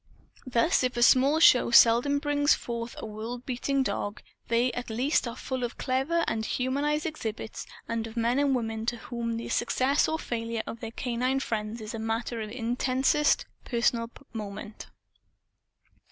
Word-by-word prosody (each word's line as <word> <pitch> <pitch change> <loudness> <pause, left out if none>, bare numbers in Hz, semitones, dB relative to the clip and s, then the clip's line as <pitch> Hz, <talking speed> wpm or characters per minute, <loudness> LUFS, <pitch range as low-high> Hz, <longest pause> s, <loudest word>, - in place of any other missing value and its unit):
Thus, 255 +6 +2
if 255 -1 0
small 275 +5 +5
shows 250 -6 +7
seldom 240 +5 +5
bring 290 0 -1
forth 235 -4 0
a - - -6
world 225 +3 -6
beating 270 +2 0
dog, 205 -5 -3 0.2
they 235 +2 +2
at 245 +1 -5
least 250 +4 +1
are 230 - -5
full 260 0 -4
of 240 - -4
clever 270 +7 0
and 220 -1 -1
humanized 285 +6 -1
exhibits 225 -8 -5 0.2
and 230 -1 -2
of 225 +1 -11
men 235 +3 +2
and 280 -2 +2
women 225 -2 -3
to 240 - 0
whom 230 -1 -4
the 230 - -5
success 260 +4 +2
or 315 - 0
failure 230 -4 -3
of 230 - -7
their 225 - -5
canine 250 +3 -1
friends 220 -2 -3
is 215 +1 -6
a 225 - -4
matter 225 +1 -2
of 215 - -5
intensest 255 +5 +1 0.2
personal 235 -1 0 0.2
moment. 210 -1 -7
240 Hz, 160 wpm, -28 LUFS, 225-265 Hz, 0.2 s, shows